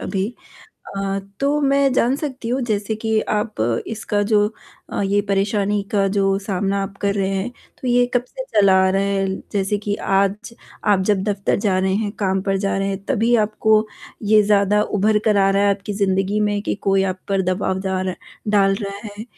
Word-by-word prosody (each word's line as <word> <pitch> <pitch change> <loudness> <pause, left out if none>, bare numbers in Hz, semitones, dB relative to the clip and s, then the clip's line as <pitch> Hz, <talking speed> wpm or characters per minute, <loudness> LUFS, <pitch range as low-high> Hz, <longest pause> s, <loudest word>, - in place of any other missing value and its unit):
अभी। 195 -1 -2 0.7
अ, 195 0 -1 0.2
तो 285 +2 +1
मैं 275 -1 +3
जान 255 +1 +2
सकती 270 -5 -5
हूँ 255 +3 0
जैसे 215 -2 -1
कि 220 0 0
आप 210 - -2 0.3
इसका 215 -2 -2
जो 205 0 +3 0.5
अ, - - -1
ये 200 +1 +2
परेशानी 200 +1 +1
का 200 -1 +2
जो 195 -1 +2
सामना 195 0 -1
आप 195 0 -6
कर 200 0 +1
रहे 195 -1 0
हैं। 195 +5 -2 0.3
तो 255 - -3
ये 245 0 +4
कब 245 0 +2
से - - -7 0.2
चला 195 -1 +5
आ - - +3
रहा 195 +1 +1
है? 200 -1 0 0.3
जैसे 200 +1 0
कि 205 0 -2
आज 200 +5 0 0.3
आप 205 -2 +3
जब 195 -2 +2
दफ़्तर 200 -2 0
जा 195 -3 +1
रहे 190 0 +1
हैं, 205 0 -1
काम 190 -2 -1
पर 195 -1 0
जा 195 0 -1
रहे 195 0 -1
हैं, 195 0 -4
तभी 235 0 +1
आपको 215 0 +2 0.4
ये 215 0 +5
ज़्यादा 205 0 +3
उभर 210 +1 +1
कर 215 -2 +3
आ 195 -1 +4
रहा 195 +1 +2
है 205 - +4
आपकी 200 +1 -7
ज़िंदगी 195 +2 +1
में 205 -1 +1
कि - - -1
कोई 195 -1 +1
आप 185 - -17
पर 195 -1 +1
दबाव 185 +1 -1
दाला 190 -1 -1 0.4
डाल 200 -2 +4
रहा 200 0 -5
है। 205 +1 -8
200 Hz, 200 wpm, -20 LUFS, 195-215 Hz, 0.7 s, चला